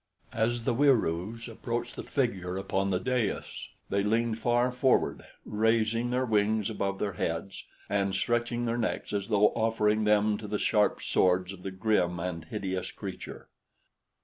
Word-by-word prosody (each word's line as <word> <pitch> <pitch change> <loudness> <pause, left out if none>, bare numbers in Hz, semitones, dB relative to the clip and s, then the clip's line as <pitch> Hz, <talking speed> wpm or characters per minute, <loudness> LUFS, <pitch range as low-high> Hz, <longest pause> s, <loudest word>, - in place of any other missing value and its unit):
As 115 +1 0
the - - +2
Wieroos 115 - +1
approached 120 +1 -4
the - - -5
figure 95 -9 -1
upon 95 0 -1
the 90 -2 +1
dais, 125 -2 -2 0.2
they 100 - +2
leaned 115 +2 +1
far 120 +1 +2
forward, 125 +1 +2 0.2
raising 110 +2 +1
their 125 +1 +1
wings 110 -1 +1
above 100 -2 -2
their 100 -1 -2
heads 85 +3 -3 0.2
and 100 -1 0
stretching 120 0 0
their 120 +1 -1
necks 110 - -2
as 100 -1 -1
though 105 -1 +4
offering 110 -1 +1
them 105 0 +3
to 105 - -7
the 105 - -1
sharp 105 0 +2
swords 90 +1 +2
of 95 - -12
the 95 - -4
grim 95 -3 +1
and 85 -2 -4
hideous 95 -1 -3
creature. 95 -3 -8
105 Hz, 155 wpm, -29 LUFS, 95-115 Hz, 0.2 s, though